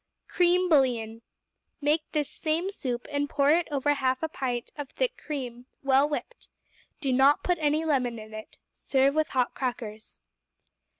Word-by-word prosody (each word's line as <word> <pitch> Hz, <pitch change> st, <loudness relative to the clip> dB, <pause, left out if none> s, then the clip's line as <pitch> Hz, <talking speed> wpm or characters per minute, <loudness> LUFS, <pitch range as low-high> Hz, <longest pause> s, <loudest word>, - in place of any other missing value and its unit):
Cream 360 Hz, +1 st, +3 dB
Bouillon 240 Hz, -7 st, +2 dB, 0.6 s
Make 300 Hz, +1 st, 0 dB
this 300 Hz, -3 st, 0 dB
same 330 Hz, +5 st, -2 dB
soup, 245 Hz, -10 st, -3 dB
and 285 Hz, 0 st, -1 dB
pour 285 Hz, 0 st, +3 dB
it 335 Hz, +2 st, +3 dB
over 290 Hz, -1 st, 0 dB
a -, -, +6 dB
half 260 Hz, 0 st, 0 dB
pint 245 Hz, -3 st, -3 dB
of 290 Hz, -3 st, -6 dB
thick -, -, -1 dB
cream, 250 Hz, -4 st, -6 dB, 0.2 s
well 275 Hz, +2 st, +4 dB
whipped. 475 Hz, +11 st, -6 dB, 0.5 s
Do 270 Hz, -4 st, 0 dB
not 270 Hz, +3 st, +4 dB
put 355 Hz, -2 st, +1 dB
any 305 Hz, +1 st, +1 dB
lemon 255 Hz, -6 st, +1 dB
in 215 Hz, 0 st, -10 dB
it. 215 Hz, 0 st, -9 dB, 0.2 s
Serve 270 Hz, 0 st, +2 dB
with 310 Hz, +1 st, +1 dB
hot 255 Hz, -2 st, 0 dB
crackers. 225 Hz, -4 st, -5 dB
280 Hz, 160 wpm, -27 LUFS, 250-310 Hz, 0.6 s, a